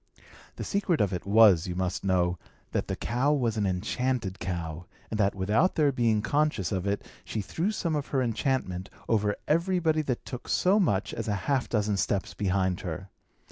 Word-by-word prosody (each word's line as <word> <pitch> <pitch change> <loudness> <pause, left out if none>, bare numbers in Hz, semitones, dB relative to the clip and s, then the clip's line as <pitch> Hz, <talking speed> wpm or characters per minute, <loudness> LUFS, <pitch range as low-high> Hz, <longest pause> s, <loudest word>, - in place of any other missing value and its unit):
The - - -5
secret 195 -5 0
of 100 -2 +1
it 90 - -4
was, 100 -4 +6
you 90 - -3
must 90 0 -2
know, 90 -2 +1 0.3
that - - -1
the - - -2
cow 130 +4 0
was 120 -6 0
an 105 -2 +1
enchanted 105 +2 -1
cow, 85 -1 -4 0.2
and 110 - -2
that, 100 -1 +2
without 105 - +2
their 150 -3 +3
being 115 -5 +1
conscious 145 - +1
of 95 -1 -1
it, 100 0 -1 0.2
she 110 - -4
threw 160 - -1
some 170 -7 -1
of 145 -2 -2
her 135 -2 +1
enchantment 115 -6 -1 0.2
over 105 -2 +2
everybody 165 -1 +2
that 130 -5 -3
took 125 -2 -7
so 195 +4 +3
much 100 - +1
as 115 - -4
half 120 +6 0
a - - -19
dozen 105 -2 +1
steps 95 0 -1
behind 95 -2 0
her. 90 +2 -6
105 Hz, 185 wpm, -28 LUFS, 95-140 Hz, 0.3 s, was